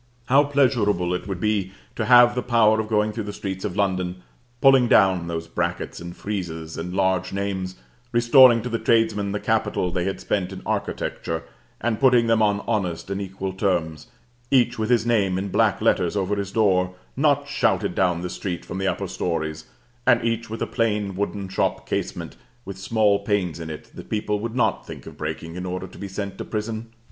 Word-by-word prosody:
how 135 +4 +5
pleasurable 120 -11 +2
it 90 - -4
would 95 -3 -4
be 105 -2 0 0.2
to - - -1
have 120 -1 +7
the 125 - -1
power 115 -3 +3
of 110 - -2
going 105 -1 +1
through 110 0 -3
the 105 - -5
streets 95 -2 -5
of 100 -4 -3
London, 90 -2 -1 0.4
pulling 135 -2 +6
down 95 -6 +4
those 85 -1 -4
brackets 85 +1 -3
and 85 0 -8
friezes 85 -6 -5
and 85 +2 -5
large 95 -2 +1
names, 95 -2 -3 0.4
restoring 120 0 +6
to - - -3
the 115 -1 -1
tradesmen 110 -3 +2
the 105 - -2
capital 110 -6 0
they 90 0 -1
had 95 - -2
spent 95 -2 -1
in 95 - -8
architecture, 80 0 -3 0.4
and 115 -1 -1
putting 125 -3 +5
them 115 -1 +3
on 105 -1 +2
honest 95 -5 -2
and 100 +1 -2
equal 95 0 -5
terms, 85 -6 -1 0.4
each 120 -3 +3
with 110 +1 -1
his 120 -2 +3
name 100 -6 +2
in 100 +1 -3
black - - +2
letters 90 +3 +2
over 100 +1 0
his 100 -1 -3
door, 95 -4 +2 0.2
not 145 0 +2
shouted 140 - +1
down 90 -2 +1
the - - -2
street 90 -3 -4
from 90 - -5
the 95 - 0
upper 100 +1 -1
stories, 80 -4 -3 0.4
and 120 -2 +4
each 115 0 -1
with 115 - -3
a - - 0
plain 105 -4 -1
wooden 100 0 -3
shop 95 - -1
casement, - - -3 0.3
with 100 - -6
small 105 +1 +2
panes 100 -5 -1
in 80 -1 -6
it 75 - -9
that - - -10
people 105 -1 -1
would 115 +2 -4
not 110 -5 +1
think - - -10
of - - -10
breaking 80 +2 -5
in 90 - -5
order 90 0 -4
to 95 - -13
be 100 - -5
sent 100 0 -5
to - - -3
prison! 110 +1 -4
100 Hz, 200 wpm, -23 LUFS, 90-115 Hz, 0.4 s, have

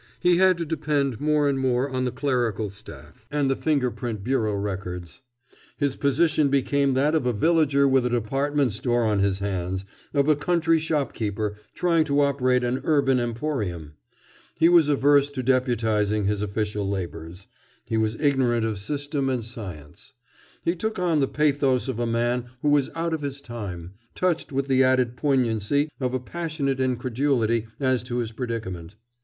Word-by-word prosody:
He 175 -1 +3
had 185 -1 +4
to 170 - -3
depend 145 -5 -1
more 150 -1 +2
and 140 -1 0
more 130 0 +1
on 130 -2 -2
the 125 - -1
clerical 120 -6 -1
staff 100 +2 -14
and 145 -2 +1
the - - +1
finger 140 -5 0
print 115 -5 -5
bureau 110 -4 0
records. 95 -2 -5 0.6
His 140 -2 0
position 145 +1 +2
became 140 0 +1
that 145 +4 +2
of 155 -6 +1
a 125 - +1
villager 140 +2 +3
with 135 -1 +3
a - - -1
department 135 +2 0
store 120 +2 0
on 105 -2 +1
his 100 -1 +1
hands, 95 -1 -3 0.3
of 140 -1 +1
a 155 - +5
country 165 +1 +2
shopkeeper 110 -9 -2 0.2
trying 170 -2 +2
to 145 -1 +2
operate 130 -3 +2
an 125 +2 -1
urban 140 -4 +2
emporium. 115 - -3 0.6
He 165 +1 +5
was 170 -4 +6
averse 145 0 +4
to 135 -3 -5
deputizing 110 -5 +1
his 105 0 0
official 105 -1 -2
labors. 90 -1 -5 0.4
He 115 -1 -1
was 110 0 0
ignorant 130 -6 +2
of 110 -3 -2
system 145 +4 -2
and 125 -3 -1
science. 95 - -9 0.5
He 170 - +2
took 220 +5 -3
on 175 -4 +1
the 135 - +2
pathos 140 -3 +1
of 130 -3 -3
a 120 - 0
man 120 +1 0 0.2
who 145 0 +4
is 140 -2 +1
out 165 0 -1
of 160 - -2
his 140 -1 -4
time, 100 -9 -7 0.2
touched 175 -4 -1
with 135 0 -1
the 130 -1 +4
added 130 -2 +2
poignancy 130 +1 +1
of 130 -1 -1
a - - 0
passionate 145 -1 -3
incredulity 125 -2 0
as 130 -3 +1
to 120 +1 -4
his 115 -2 -2
predicament. 110 -7 -5
130 Hz, 170 wpm, -24 LUFS, 110-145 Hz, 0.6 s, was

